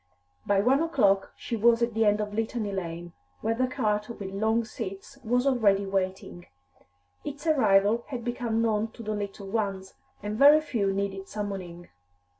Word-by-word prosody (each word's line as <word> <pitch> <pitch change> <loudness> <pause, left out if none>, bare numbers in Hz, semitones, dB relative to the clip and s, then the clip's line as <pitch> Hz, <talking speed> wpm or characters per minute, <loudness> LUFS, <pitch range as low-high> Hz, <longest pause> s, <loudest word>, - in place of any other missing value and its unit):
By 200 -1 +3
one 265 +7 +3
o'clock 205 -12 +2
she 235 - -4
was 230 +1 +4
at 235 -1 0
the 225 0 +2
end 210 0 +3
of 210 -1 -3
Litany 220 -1 -2
Lane, 175 -2 -5 0.3
where 225 - 0
the 255 +3 0
cart 215 -4 -1
with 200 -5 -6
long 220 +3 +1
seats 215 +4 -8
was 245 +3 +1
already 210 -7 +3
waiting; 190 -2 -3 0.8
its 290 +1 -7
arrival 220 -6 +3
had 240 -4 -6
become 235 -2 -1
known 220 -1 +1
to 230 - -10
the 215 0 -2
little 200 -1 -5
ones, 195 -3 -2 0.3
and 210 +2 -4
very 290 +2 +8
few 225 -10 -1
needed 195 0 -3
summoning. 185 -5 -6
215 Hz, 165 wpm, -27 LUFS, 195-235 Hz, 0.8 s, very